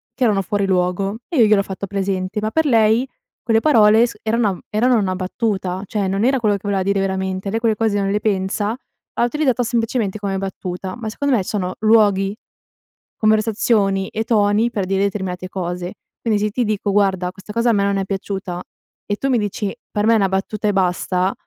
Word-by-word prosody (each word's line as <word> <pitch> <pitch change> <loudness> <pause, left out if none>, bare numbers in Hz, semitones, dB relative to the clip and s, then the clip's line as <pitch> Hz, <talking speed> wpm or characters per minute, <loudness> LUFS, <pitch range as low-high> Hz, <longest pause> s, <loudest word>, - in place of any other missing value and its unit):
che - - -1
erano 205 -4 +2
fuori 200 +1 -1
luogo 190 +2 0
e 335 - -2
io 230 - +7
gliel'ho 210 -2 +4
fatto 195 0 -6
presente, 195 +1 -2
ma 215 +1 -2
per 320 +4 +1
lei, 230 -1 +3 0.4
quelle 225 -1 +2
parole 225 -5 +5
s 230 - -10
eranam 220 -4 0
erano 240 +3 +3
una 190 -3 0
battuta, 190 -1 -2
cioè 200 0 -2
non 195 +3 0
era 265 +1 +3
quello 210 -2 +2
che 200 - -6
voleva 200 -2 0
dire 200 +1 +1
veramente, 190 0 -2
lei 225 - 0
quelle 230 -2 +1
cose 210 -1 0
non 195 0 0
le 205 - +1
pensa, 205 +2 -1 0.4
l'ha - - +1
utilizzata 255 -1 +1
semplicemente 225 -3 -1
come 200 -1 -2
battuta, 190 0 -5
ma 225 -2 -4
secondo 280 +4 0
me 205 - +1
sono 185 -2 -3
luoghi, 205 -3 +3 0.8
conversazioni 215 -2 +2
e 220 - -2
toni 210 0 +2
per 200 -5 -2
dire 195 +1 0
determinate 190 -2 -3
cose. 180 -1 -4 0.3
Quindi 220 -3 +1
se 210 +1 0
ti 245 +4 0
dico: 210 -1 -1
"Guarda 190 -3 +1
questa 195 +2 -11
cosa 235 +1 +2
a - - +2
me 200 -2 +2
non 200 0 +1
è 195 - -1
piaciuta;" 190 -2 -4 0.5
e 205 - 0
tu 270 - -1
mi 255 - +3
dici: 205 -1 -3 0.2
"Per 210 0 0
me 230 - +5
è - - +5
una 195 -2 +2
battuta 195 +3 -2
e 205 - +2
basta;" 185 0 +1
205 Hz, 205 wpm, -20 LUFS, 190-220 Hz, 0.8 s, io